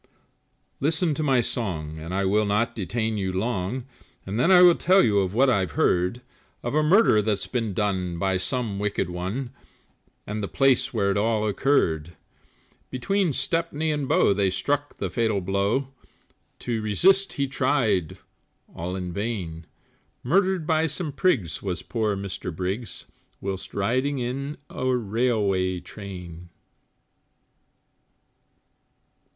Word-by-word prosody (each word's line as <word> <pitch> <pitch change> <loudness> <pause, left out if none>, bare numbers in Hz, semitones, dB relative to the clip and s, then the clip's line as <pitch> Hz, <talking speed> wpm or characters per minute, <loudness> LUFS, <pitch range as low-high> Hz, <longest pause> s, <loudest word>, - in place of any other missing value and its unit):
Listen 160 +3 +1
to 145 - -3
my 135 -5 +3
song, 80 -10 -3
and 80 +2 -7
I 95 +1 0
will 105 +2 +2
not 110 +3 +1
detain 110 +2 -2
you 95 -2 -1
long, 105 +4 -2 0.4
And 100 +4 -3
then 130 - +3
I 180 -1 +8
will 175 -1 +8
tell 185 +3 +4
you 105 -3 +3
of 95 0 -1
what 135 +3 +4
I've 95 -10 +1
heard. 90 +11 +1 0.4
Of 120 - -3
a 155 - +3
murder 155 - +5
that's 105 -2 -1
been 115 -6 -2
done, 95 -4 -1
by 95 +1 +1
some 110 0 -2
wicked 100 -3 -1
one, 100 +9 -4 0.7
And 105 +1 -4
the 100 - -2
place 135 +2 +2
where 100 -4 +1
it 100 - 0
all 110 0 +1
occurred; 85 - +1 0.7
Between 180 +8 0
Stepney 160 +1 0
and 145 -3 -2
Bow 100 - +4
they 100 -1 +1
struck 145 +9 -1
the - - -4
fatal 110 -4 +1
blow, 100 +8 0 0.7
To 115 -3 -2
resist 190 - +3
he 140 - 0
tried 125 - 0 0.6
all 90 +2 -4
in 90 -2 -4
vain, 95 -7 -4 0.6
Murdered 185 +4 +2
by 160 0 +2
some 155 +1 -4
prigs 135 - 0
was 90 -4 -4
poor 110 -3 -1
Mr 95 -2 -5
Briggs 95 +6 -4 0.3
Whilst 95 -1 -5
riding 130 +8 0
in 135 +4 -3
a 130 - -4
railway 100 -5 0
train. 90 -3 -9
110 Hz, 140 wpm, -25 LUFS, 95-135 Hz, 0.7 s, I